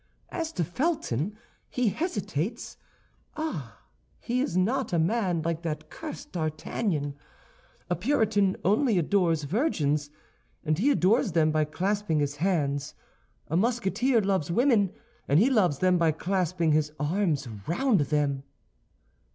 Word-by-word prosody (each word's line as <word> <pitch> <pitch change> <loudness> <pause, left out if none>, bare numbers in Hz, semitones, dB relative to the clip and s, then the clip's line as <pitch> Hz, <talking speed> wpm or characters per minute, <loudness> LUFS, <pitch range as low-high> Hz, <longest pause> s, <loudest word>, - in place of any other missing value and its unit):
As 325 -2 -3
to 175 - 0
Felton, 210 - -1 0.3
he 250 -3 +1
hesitates. 205 - -3 0.6
Ah, 160 - -5 0.4
he 250 +2 -1
is 185 -10 -1
not 235 +6 +1
a 175 - +1
man 175 -1 +1
like 165 0 -1
that 155 -2 -5
cursed 305 -1 -8
D'Artagnan. 155 -1 -2 0.7
A 175 - 0
Puritan 205 - +2
only 215 +3 +3
adores 170 -2 +2
virgins, 150 - 0 0.6
and 155 +1 +1
he 260 +8 +3
adores 220 - +3
them 155 -2 +3
by 155 0 +2
clasping 190 +1 -1
his 145 0 -1
hands. 150 -4 0 0.5
A 160 - -2
Musketeer 235 +3 +2
loves 190 -6 0
women, 215 -1 +3 0.4
and 145 +3 +4
he 245 +7 +4
loves 185 - +3
them 180 +2 +3
by 165 -1 +4
clasping 175 -1 0
his 150 0 +2
arms 150 -3 0 0.2
round 230 - +2
them." 145 -1 0
180 Hz, 130 wpm, -27 LUFS, 155-220 Hz, 0.7 s, and